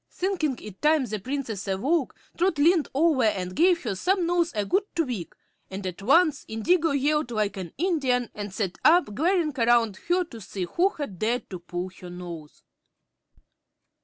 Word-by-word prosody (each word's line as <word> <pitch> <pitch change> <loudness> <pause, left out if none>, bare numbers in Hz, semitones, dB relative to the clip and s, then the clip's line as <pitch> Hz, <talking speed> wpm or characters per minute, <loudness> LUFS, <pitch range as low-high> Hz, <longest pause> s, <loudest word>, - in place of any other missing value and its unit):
Thinking 340 -8 -1
it 210 -3 -10
time 300 -2 +3
the 215 -2 -4
Princess 235 -3 -4
awoke, 260 - 0 0.2
Trot 350 -2 +1
leaned 320 +2 +4
over 300 -3 +3
and 185 -4 -1
gave 350 +1 +3
her 230 - -2
snubnose 350 - +1
a 205 -1 0
good 385 - +2
tweak, 250 - -2 0.3
and 190 +1 -6
at 185 0 -5
once 310 - +3
Indigo 325 +10 +1
yelled 285 -1 +1
like 215 -3 -1
an 185 -4 -6
Indian 270 - 0
and 205 -1 -6
sat 190 -2 -3
up, 335 -8 +5
glaring 325 - +1
around 230 -3 +3
her 360 +1 +3
to 235 -10 -11
see 190 -1 -5
who 345 - +2
had 285 - -7
dared 235 +3 -1
to 185 - -5
pull 175 +1 -5
her 180 - -9
nose. 175 -4 -9
250 Hz, 165 wpm, -26 LUFS, 200-330 Hz, 0.3 s, up